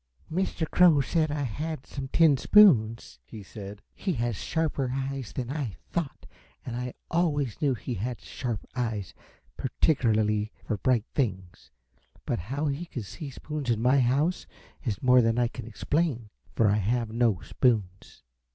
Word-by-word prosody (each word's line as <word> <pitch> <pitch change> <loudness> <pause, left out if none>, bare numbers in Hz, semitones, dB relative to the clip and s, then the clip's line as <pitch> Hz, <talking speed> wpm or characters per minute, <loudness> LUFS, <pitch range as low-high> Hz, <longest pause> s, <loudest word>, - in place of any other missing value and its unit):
"Mr. 175 -2 -1
Crow 175 -4 +5
said 155 +3 +1
I 145 0 -2
had 150 +4 -4
some 135 -1 -6
tin 155 +1 +5
spoons?" 125 - +5
he 110 -3 -10
said. 100 0 -9
"He 190 - -2
has 120 -4 -1
sharper 150 - -1
eyes 135 -2 -3
than 125 -1 -4
I 140 -9 -3 0.2
thought 165 -6 -3 0.4
and 120 - -4
I 125 0 -4 0.2
always 150 -6 0
knew 140 -4 +2
he 125 +2 -5
had 120 +4 -3
sharp 120 -6 -5
eyes, 115 -6 -2 0.4
particularly 110 -7 +1
for 105 - -1
bright 120 0 +1
things, 95 -9 -3 0.6
but - - -1
how 135 - -3
he 145 +4 -2
could 120 -9 -6
see 140 - -7
spoons 150 0 -5
in 115 -2 +2
my 125 +4 +4
house 140 +8 +1 0.4
is 115 -5 -3
more 125 0 +6
than 115 0 +1
I 120 -1 +3
can 115 -1 -8
explain, 125 -2 -1 0.2
for 110 - +4
I 105 +1 +3
have 115 +2 0
no 115 -5 +2
spoons." 105 -7 -1
125 Hz, 160 wpm, -27 LUFS, 110-145 Hz, 0.6 s, more